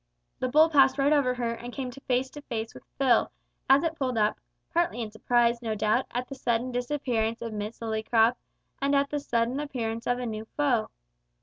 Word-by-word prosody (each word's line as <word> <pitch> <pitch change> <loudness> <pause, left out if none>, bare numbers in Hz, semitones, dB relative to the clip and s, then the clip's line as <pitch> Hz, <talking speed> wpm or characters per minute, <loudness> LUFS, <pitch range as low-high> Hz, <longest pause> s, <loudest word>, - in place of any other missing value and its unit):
The 255 - 0
bull 310 +5 +6
passed 275 -4 +4
right 280 +2 +3
over 260 -4 +2
her, 235 -2 -1
and 240 +1 -8
came 255 -1 -4
face 260 0 -2
to 295 - -9
face 225 -5 -5
with - - -13
Phil, 255 -4 +3 0.4
as 270 +3 +6
it 330 -1 0
pulled 255 -5 -2
up, 210 0 +1 0.3
partly 345 -6 +1
in 220 -2 -4
surprise, 235 +2 +2
no 225 -2 -2
doubt, 215 +4 +1
at 250 +1 -3
the - - -7
sudden 245 -1 -1
disappearance 245 -3 -1
of 230 -1 -5
Miss 210 +1 -5
Lillycrop 225 +1 +2 0.5
and 280 +1 +2
at 280 0 +2
the 295 - 0
sudden 240 -1 0
appearance 230 -6 -3
of 245 - +2
a 250 - -4
new 220 -1 -4
foe. 265 -7 +2
245 Hz, 200 wpm, -27 LUFS, 230-275 Hz, 0.5 s, bull